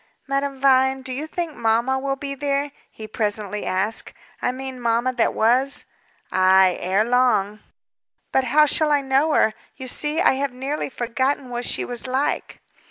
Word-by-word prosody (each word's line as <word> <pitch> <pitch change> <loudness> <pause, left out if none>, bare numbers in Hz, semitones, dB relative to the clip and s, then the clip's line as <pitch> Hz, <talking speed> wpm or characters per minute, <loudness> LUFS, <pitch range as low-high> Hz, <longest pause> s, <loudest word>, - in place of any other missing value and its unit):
'" - - -46
"Madame 275 0 -2
Vine, 265 0 +3
do 260 0 -5
you 295 +5 -4
think 335 -1 -4
mamma 235 +3 +1
will 275 0 -2
be 275 0 -5
there?" 280 +1 -1 0.2
he 220 - -10
presently 210 -1 -2
asked. 195 +4 -2 0.3
"I - - +1
mean 260 0 -7
mamma 235 +2 +1
that 240 -2 +1
was." 260 +5 +2 0.5
"Ay, 185 0 +5
ere 190 +4 +1
long." 220 -4 +2 0.7
"But 265 - +2
how 300 +5 +5
shall 300 +1 +2
I 290 -1 +3
know 275 +3 +2
her? 220 - +3 0.2
You 260 - -8
see, 295 +5 -1
I - - +5
have 280 -3 -1
nearly 275 +4 -3
forgotten 260 +2 -2
what 240 0 -3
she - - 0
was 245 +1 -4
like." 265 +3 -2
260 Hz, 170 wpm, -22 LUFS, 230-275 Hz, 0.7 s, Ay